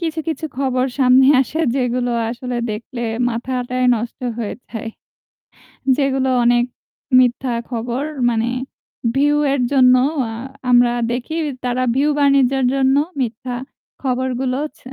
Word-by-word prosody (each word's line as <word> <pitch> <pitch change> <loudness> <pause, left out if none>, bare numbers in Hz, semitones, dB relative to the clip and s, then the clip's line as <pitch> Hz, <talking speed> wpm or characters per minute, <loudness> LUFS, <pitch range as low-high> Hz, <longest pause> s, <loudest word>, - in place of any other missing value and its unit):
কিছু, 325 -1 -3
কিছু 315 -1 -3
খবর 255 -2 +1
সামনে 260 0 +5
আসে 270 +4 -2 0.2
যেগুলো 245 -1 0 0.2
আসলে 250 0 -5
দেখলে 235 +3 -6 0.3
মাথাটাই 250 +1 -2
নষ্ট 230 +1 -5 0.2
হয়ে 220 -3 -3
যায়। 225 -1 -6 1.1
যেগুলো 270 -2 +1
অনেক 240 0 +3 0.5
মিথ্যা 250 0 +1 0.2
খবর 240 +2 -3 0.3
মানে 225 -1 0 0.7
ভিউ 290 +2 +3 0.2
এর 280 - 0
জন্য 255 -2 +6 0.3
অ্যা 225 -3 -3 0.4
আমরা 245 -1 +5 0.2
দেখি 245 +6 -3 0.3
তারা 250 0 0
ভিউ 285 +3 +2
বাণিজ্যের 275 -2 +3
জন্য 270 0 +3 0.3
মিথ্যা 245 +1 -3 0.5
খবরগুলো 255 0 -1 0.2
ছ - - -24
255 Hz, 120 wpm, -19 LUFS, 245-270 Hz, 1.1 s, জন্য